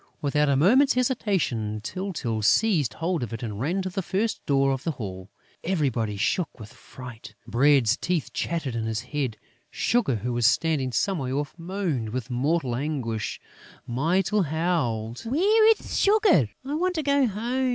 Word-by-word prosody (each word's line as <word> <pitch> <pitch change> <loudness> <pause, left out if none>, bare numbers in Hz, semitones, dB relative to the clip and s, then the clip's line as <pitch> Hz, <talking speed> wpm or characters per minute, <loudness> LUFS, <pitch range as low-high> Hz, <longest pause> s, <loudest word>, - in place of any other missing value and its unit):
Without 150 -1 +1
a 140 - +3
moment's 250 - +4
hesitation, 190 - 0
Tyltyl 120 - -3
seized 150 - +3
hold 170 0 -1
of 115 -2 -4
it 115 - -5
and 105 -3 -5
ran 175 +10 -1
to 185 - -3
the 195 - -2
first 205 +5 -2
door 135 -1 +3
of 135 -1 -3
the 165 - -1
hall. 95 -7 -7 0.3
Everybody 130 - -1
shook 165 - -1
with 105 -1 -10
fright. 120 -3 -11
Bread's 125 -2 +3
teeth 175 -5 -2
chattered 155 -8 -2
in 115 -1 -2
his 110 -1 -2
head; 125 -3 -3 0.3
Sugar, 225 - +1
who 120 +3 -3
was 120 -1 +3
standing 140 -2 +1
some 190 +7 0
way 130 -2 -3
off, 145 +2 -2
moaned 170 - -3
with 125 +2 -5
mortal 135 0 0
anguish; 125 -6 -3 0.5
Mytyl 175 - +1
howled: 140 -9 -1
"Where 405 - +4
is 450 - +1
Sugar?... 405 - +4 0.2
I 280 - -3
want 360 +4 0
to 315 - -1
go 280 -2 +3
home!" 240 +5 -1
145 Hz, 165 wpm, -25 LUFS, 120-195 Hz, 0.5 s, moment's